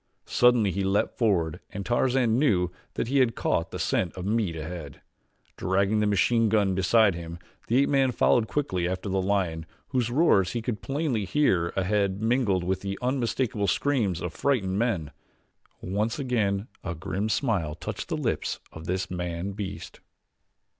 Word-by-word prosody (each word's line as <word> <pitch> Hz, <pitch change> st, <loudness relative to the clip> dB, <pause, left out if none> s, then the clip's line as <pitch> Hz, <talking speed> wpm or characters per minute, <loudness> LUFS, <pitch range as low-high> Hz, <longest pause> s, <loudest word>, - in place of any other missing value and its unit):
Suddenly 120 Hz, -5 st, +4 dB
he 100 Hz, +3 st, -2 dB
leaped 95 Hz, +1 st, +1 dB
forward 90 Hz, -7 st, +1 dB
and 100 Hz, -1 st, -6 dB
Tarzan 120 Hz, -1 st, +2 dB
knew 90 Hz, -11 st, +2 dB, 0.2 s
that -, -, -1 dB
he 135 Hz, +3 st, +2 dB
had 120 Hz, -3 st, +3 dB
caught 85 Hz, -, 0 dB
the -, -, -6 dB
scent 90 Hz, -, 0 dB
of 90 Hz, -, -5 dB
meat 105 Hz, -5 st, 0 dB
ahead. 80 Hz, -3 st, -7 dB, 0.6 s
Dragging 100 Hz, +3 st, +1 dB
the 105 Hz, -, +2 dB
machine 110 Hz, +3 st, +3 dB
gun 100 Hz, -3 st, +2 dB
beside 95 Hz, +3 st, +4 dB
him 85 Hz, 0 st, -7 dB, 0.3 s
the 120 Hz, -, +2 dB
ape -, -, -1 dB
man 135 Hz, -2 st, +3 dB
followed 120 Hz, -2 st, +3 dB
quickly 95 Hz, -13 st, -1 dB
after 95 Hz, +2 st, -3 dB
the 95 Hz, 0 st, +1 dB
lion 90 Hz, -5 st, -1 dB, 0.2 s
whose 125 Hz, -3 st, 0 dB
roars 120 Hz, -, +3 dB
he 120 Hz, -, -2 dB
could 115 Hz, -3 st, -3 dB
plainly 135 Hz, -6 st, -1 dB
hear 95 Hz, -, +2 dB
ahead 95 Hz, 0 st, 0 dB
mingled 110 Hz, -5 st, +1 dB
with 95 Hz, +1 st, -1 dB
the 100 Hz, 0 st, -4 dB
unmistakable 125 Hz, -4 st, -1 dB
screams 110 Hz, -, +1 dB
of 90 Hz, -1 st, -4 dB
frightened 100 Hz, -8 st, 0 dB
men. 100 Hz, -11 st, -1 dB, 0.7 s
Once 105 Hz, +5 st, -1 dB
again 110 Hz, -7 st, 0 dB, 0.2 s
a 90 Hz, -2 st, -4 dB
grim 95 Hz, +5 st, -3 dB
smile 100 Hz, -, 0 dB
touched -, -, -6 dB
the -, -, -1 dB
lips -, -, -2 dB
of 80 Hz, 0 st, -9 dB
this 95 Hz, +2 st, -2 dB
man 90 Hz, +1 st, -3 dB
beast. 100 Hz, 0 st, -7 dB
100 Hz, 165 wpm, -27 LUFS, 90-120 Hz, 0.7 s, Suddenly